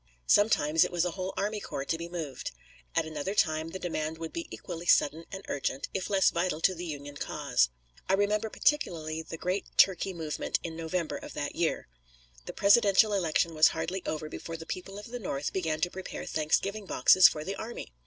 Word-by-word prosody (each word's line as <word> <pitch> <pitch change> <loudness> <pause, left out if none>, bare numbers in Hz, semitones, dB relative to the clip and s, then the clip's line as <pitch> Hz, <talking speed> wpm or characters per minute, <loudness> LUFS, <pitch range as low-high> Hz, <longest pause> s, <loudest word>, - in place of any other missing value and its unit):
Sometimes 165 - +4
it - - -2
was 175 -1 +1
a 180 - -1
whole 185 +1 -4
army 210 +1 -1
corps 140 -8 -5
to 165 - 0
be 170 +1 -6
moved. 160 -7 -5 0.5
At - - +2
another 160 +5 -4
time 155 -4 +2
the 190 - -5
demand 160 -3 -3
would 165 0 -6
be 335 - -4
equally 175 -1 -7
sudden 160 +3 +3
and 195 0 -7
urgent, 135 -1 -2
if 190 - -2
less 195 -2 +4
vital 170 -2 -1
to 185 - +4
the 175 0 -6
Union 145 -2 -6
cause. - - +1 0.4
I - - +4
remember 210 +2 +1
particularly 160 - 0
the 165 0 -8
great 185 +4 -2
turkey 190 0 +4
movement 160 -3 -2
in 165 -1 -5
November 165 0 -2
of - - -9
that - - -4
year. - - -1 0.6
The - - -3
presidential 205 0 +5
election 170 -3 +1
was 155 0 +7
hardly 175 +4 -3
over 155 0 -3
before 165 +1 -6
the 160 - -9
people 195 +3 -6
of 205 - -8
the 245 - -4
North 145 -9 -3
began 160 -4 -1
to 175 - +1
prepare 190 0 -6
Thanksgiving 195 +7 0
boxes 185 -1 +7
for 150 - -3
the 195 +4 -4
army. 220 - -7
170 Hz, 200 wpm, -29 LUFS, 155-195 Hz, 0.6 s, was